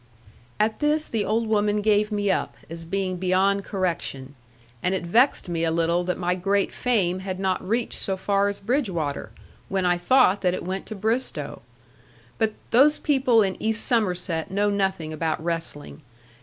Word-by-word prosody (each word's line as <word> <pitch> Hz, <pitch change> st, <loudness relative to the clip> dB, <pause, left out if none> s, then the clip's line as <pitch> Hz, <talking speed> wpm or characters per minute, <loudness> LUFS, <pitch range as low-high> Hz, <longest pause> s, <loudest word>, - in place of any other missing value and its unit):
At 215 Hz, +1 st, +1 dB
this 300 Hz, +1 st, +1 dB
the 220 Hz, -3 st, -2 dB
old 225 Hz, +3 st, 0 dB
woman 210 Hz, -1 st, +1 dB
gave 210 Hz, 0 st, +2 dB
me 205 Hz, -1 st, +1 dB
up, -, -, -2 dB
as 165 Hz, 0 st, -7 dB
being 185 Hz, +1 st, -2 dB
beyond 190 Hz, +2 st, +2 dB
correction: 170 Hz, -9 st, -3 dB, 0.5 s
and 180 Hz, +2 st, +1 dB
it 180 Hz, -, -3 dB
vexed 235 Hz, +6 st, +3 dB
me 165 Hz, -1 st, -2 dB
a 165 Hz, -, +2 dB
little 170 Hz, +2 st, +1 dB
that 180 Hz, -, -1 dB
my 180 Hz, 0 st, 0 dB
great 195 Hz, +2 st, 0 dB
fame 190 Hz, -8 st, 0 dB
had 190 Hz, -1 st, -5 dB
not 190 Hz, -1 st, 0 dB
reached 225 Hz, +5 st, -1 dB
so 190 Hz, -1 st, -1 dB
far 200 Hz, +1 st, +1 dB
as 200 Hz, 0 st, -3 dB
Bridgwater, 190 Hz, -, -2 dB, 0.4 s
when 190 Hz, -1 st, 0 dB
I 175 Hz, 0 st, +2 dB
thought 205 Hz, 0 st, +4 dB
that 180 Hz, -1 st, +1 dB
it -, -, -6 dB
went 190 Hz, +1 st, -4 dB
to 215 Hz, -, -6 dB
Bristowe. 220 Hz, -, -1 dB, 0.8 s
But 220 Hz, -1 st, +1 dB, 0.2 s
those 285 Hz, +6 st, +5 dB
people 255 Hz, -6 st, +3 dB
in 190 Hz, -1 st, -3 dB
East 220 Hz, 0 st, 0 dB
Somerset 180 Hz, -6 st, 0 dB
know 205 Hz, +2 st, +1 dB
nothing 190 Hz, -6 st, -1 dB
about 160 Hz, 0 st, -1 dB
wrestling. 165 Hz, -3 st, -3 dB
195 Hz, 170 wpm, -24 LUFS, 175-215 Hz, 0.8 s, those